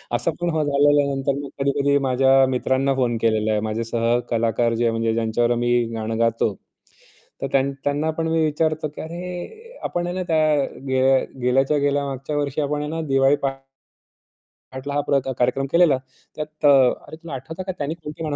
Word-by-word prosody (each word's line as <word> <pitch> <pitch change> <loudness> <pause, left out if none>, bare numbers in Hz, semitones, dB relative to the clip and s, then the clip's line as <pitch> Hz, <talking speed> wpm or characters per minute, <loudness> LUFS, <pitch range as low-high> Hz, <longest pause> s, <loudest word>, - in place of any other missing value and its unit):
असं 170 - 0
पण 175 - +1
हा 155 - +2
झाल्यानंतर 140 -1 +2
मी 140 - -7
कधी-कधी 140 +1 +2
माझ्या 135 +1 +4
मित्रांना 130 +1 +1
फोन 125 -3 0
केलेला 110 -1 +1
आहे. 105 - +1
माझे 110 +2 -2
सहकलाकार 115 0 0
जे 115 - 0
आहे 115 - +3
म्हणजे 115 0 0
ज्यांच्यावर 115 +1 +1
मी 120 - +1 0.2
गाणं 110 0 -3
गातो. 115 -2 +1 0.9
तर - - -1
त्यान 135 0 +2
त्यांना 145 +2 0
पण 165 0 0
मी 160 0 +1
विचारतो, 155 0 0
की 150 - -9
"अरे 180 - -8
आपण 175 0 -2
आहे 175 - -3
ना 185 - -2
त्या 160 -2 +2 0.5
गे 130 0 +1 0.4
गेल्याच्या 135 +4 +2
गेल्या 145 0 +1
मागच्या 135 +2 -4
वर्षी 145 0 -1
आपण 150 +1 -2
ना 165 +1 -3
दिवाळी 135 +1 +4 1.2
पहाटला 130 +2 -8
हा 145 - +1
प्रा 140 - +3
का 135 - -2
कार्यक्रम 125 +2 +1
केलेला. 170 -5 +5 0.4
त्यात 155 0 -5
अ, - - +8 0.4
अरे - - -9
तुला 165 -1 -10
आठवतं 160 +7 -6
का - - 0
त्यानी 145 +1 -2
कोणतं 150 +2 -7
गाणं 150 -2 -2
140 Hz, 180 wpm, -22 LUFS, 120-155 Hz, 1.2 s, अ